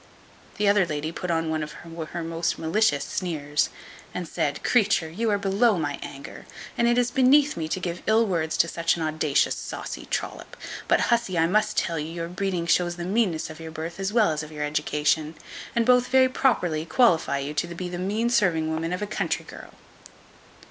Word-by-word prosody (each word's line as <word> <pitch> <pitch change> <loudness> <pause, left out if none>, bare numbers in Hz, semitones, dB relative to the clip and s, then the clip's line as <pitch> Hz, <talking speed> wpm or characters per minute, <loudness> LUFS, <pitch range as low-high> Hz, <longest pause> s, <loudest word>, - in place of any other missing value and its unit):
The 210 - +1
other 200 -1 +5
lady 155 -1 -3
put 180 +1 -5
on 165 -1 0
one 155 0 -1
of 150 0 -5
her 165 0 -6
most 165 +1 -1
malicious 160 -3 +1
sneers, 150 -5 -1 0.5
and 180 -2 -3
said, 145 -1 -2
"Creature! 200 -9 +2
you 225 +7 -1
are 205 - +2
below 200 +2 +2
my 160 - -2
anger; 140 0 -9 0.3
and 235 - +2
it 240 0 +3
is 245 0 +2
beneath 280 +4 +4
me 160 -2 -3
to 185 - -1
give 175 -1 -4
ill 220 +1 +4
words 165 -5 -1
to 170 - +4
such 170 0 0
an 165 - -3
audacious 155 -2 +1
saucy - - -6
trollop; - - -4 0.3
but, - - +4
hussy, 230 -6 0
I 165 - +4
must 210 +5 +1
tell 165 -2 0
you, 155 +2 -4
your 170 0 -4
breeding 180 -1 -2
shows 175 0 +2
the 175 0 -5
meanness 185 -6 0
of 155 - -11
your 160 0 -7
birth 160 +3 -6
as 195 +1 -1
well 215 -6 +4
as 155 -1 -2
of 150 0 -9
your 150 -1 -4
education; 150 +1 0 0.4
and 235 -1 +2
both 250 0 +4
very 260 0 +4
properly 180 - +1
qualify 165 - +3
you 140 +2 -4
to 160 +3 -1
be 175 +1 -5
the 175 0 -5
mean 215 +6 0
serving 165 -8 +2
woman 165 +2 -2
of 180 - -3
a - - 0
country 205 - -2
girl." - - -11
170 Hz, 205 wpm, -25 LUFS, 160-210 Hz, 0.5 s, other